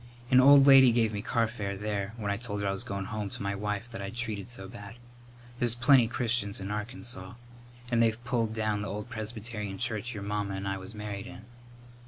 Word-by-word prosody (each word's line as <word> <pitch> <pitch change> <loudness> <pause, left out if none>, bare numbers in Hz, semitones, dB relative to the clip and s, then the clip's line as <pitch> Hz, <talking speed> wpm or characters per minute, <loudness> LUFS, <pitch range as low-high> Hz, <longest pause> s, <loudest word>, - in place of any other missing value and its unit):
An 130 0 +7
old 140 +1 +8
lady 135 -3 +8
give 115 -2 +2
me 100 - -3
carfare, 110 -4 -1
there, 105 0 -3
when 105 -3 -2
I 100 - -1
told 105 -3 -4
her - - 0
I - - +1
was 95 - 0
goin' 100 -1 -4
home 105 0 -4
to - - -6
my 100 0 -1
wife 105 +2 -3
that 115 - -6
I'd 100 +3 -6
treated 115 -3 -3
so 95 -6 -7
bad. 100 +2 -10 0.6
There's 120 -1 +2
plenty 120 0 +5
Christians 115 -4 0
in 100 +1 -5
Arkansaw. 105 -3 -4 0.6
And 120 -1 +3
they've 115 +1 +1
pulled 115 -3 0
down 110 -2 0
the 105 - -4
old 105 +4 -5
Presbyterian 110 -3 -5
church 120 0 -2
your 100 - -5
mamma 100 -1 -2
and 95 +1 -4
I 95 0 -2
was 95 +4 -10
married 105 -2 -5
in." 105 - -11
105 Hz, 215 wpm, -29 LUFS, 100-120 Hz, 0.6 s, old